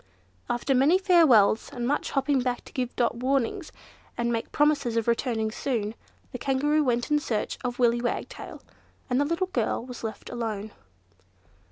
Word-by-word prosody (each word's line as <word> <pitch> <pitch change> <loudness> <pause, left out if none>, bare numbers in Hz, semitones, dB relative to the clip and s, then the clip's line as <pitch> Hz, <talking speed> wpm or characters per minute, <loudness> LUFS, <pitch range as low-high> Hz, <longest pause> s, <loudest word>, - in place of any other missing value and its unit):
After 240 +3 0
many 275 +8 +5
farewells, 315 - +4
and 240 -1 -3
much 290 +2 0
hopping 275 0 +1
back 245 -1 -2
to - - -14
give 250 -2 -3
Dot 240 -1 +1
warnings, 270 - -1 0.5
and 235 0 0
make 230 - -3
promises 290 -6 +2
of 230 - 0
returning 230 -2 0
soon, 220 -3 -2 0.4
the 250 - -6
Kangaroo 290 +4 +1
went 240 +1 0
in 295 - +4
search 225 -7 -3
of 245 -1 -3
Willy 240 -1 +3
Wagtail; 240 - -5 0.5
and 250 +3 +3
the - - +2
little 335 +5 -1
girl 235 0 0
was 250 -2 -9
left 220 -1 -6
all - - -6
alone. 220 -2 -3
250 Hz, 170 wpm, -26 LUFS, 235-285 Hz, 0.5 s, many